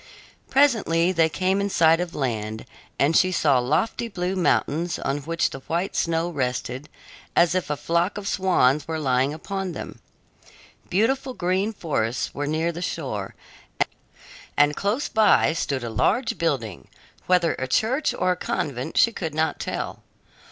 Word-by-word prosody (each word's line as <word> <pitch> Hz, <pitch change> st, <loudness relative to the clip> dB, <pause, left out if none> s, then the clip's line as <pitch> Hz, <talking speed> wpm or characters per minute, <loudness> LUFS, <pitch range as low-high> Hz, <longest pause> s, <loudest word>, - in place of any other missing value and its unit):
Presently 215 Hz, -11 st, +3 dB
they 165 Hz, -3 st, +3 dB
came 190 Hz, +4 st, 0 dB
in 200 Hz, -, -1 dB
sight 165 Hz, -3 st, +4 dB
of 175 Hz, -1 st, -4 dB
land, 110 Hz, -5 st, -3 dB, 0.3 s
and 145 Hz, +4 st, +2 dB
she 185 Hz, +3 st, +4 dB
saw 145 Hz, -7 st, +3 dB
lofty 155 Hz, -, 0 dB
blue 185 Hz, -3 st, -3 dB
mountains 170 Hz, -2 st, +1 dB
on 140 Hz, +2 st, -2 dB
which 165 Hz, +4 st, -1 dB
the 135 Hz, -, -7 dB
white 175 Hz, +4 st, -1 dB
snow 165 Hz, 0 st, 0 dB
rested 130 Hz, -1 st, -3 dB, 0.5 s
as 170 Hz, 0 st, +4 dB
if 185 Hz, -4 st, -1 dB
a 150 Hz, -, -1 dB
flock 170 Hz, +6 st, 0 dB
of 205 Hz, -1 st, -5 dB
swans 155 Hz, -7 st, +2 dB
were 160 Hz, -1 st, -2 dB
lying 135 Hz, -2 st, +1 dB
upon 190 Hz, +4 st, -4 dB
them. -, -, -8 dB, 0.9 s
Beautiful 260 Hz, +6 st, +1 dB
green 185 Hz, +4 st, 0 dB
forests 130 Hz, -, -2 dB
were 145 Hz, 0 st, -3 dB
near 160 Hz, +3 st, 0 dB
the 170 Hz, +1 st, -7 dB
shore, 130 Hz, -, -4 dB, 1.2 s
and 145 Hz, 0 st, +4 dB
close 210 Hz, +8 st, -1 dB
by 215 Hz, -7 st, +4 dB
stood 140 Hz, -5 st, -2 dB
a 120 Hz, -, -3 dB
large 225 Hz, -, +1 dB
building, 130 Hz, -, -2 dB, 0.4 s
whether 180 Hz, -3 st, +3 dB
a 130 Hz, -, -2 dB
church 250 Hz, -, +1 dB
or 185 Hz, -, 0 dB
a -, -, +1 dB
convent 155 Hz, -6 st, -3 dB
she 230 Hz, -, +5 dB
could 160 Hz, -8 st, -5 dB
not 160 Hz, +1 st, 0 dB
tell. -, -, -4 dB
165 Hz, 155 wpm, -24 LUFS, 140-185 Hz, 1.2 s, she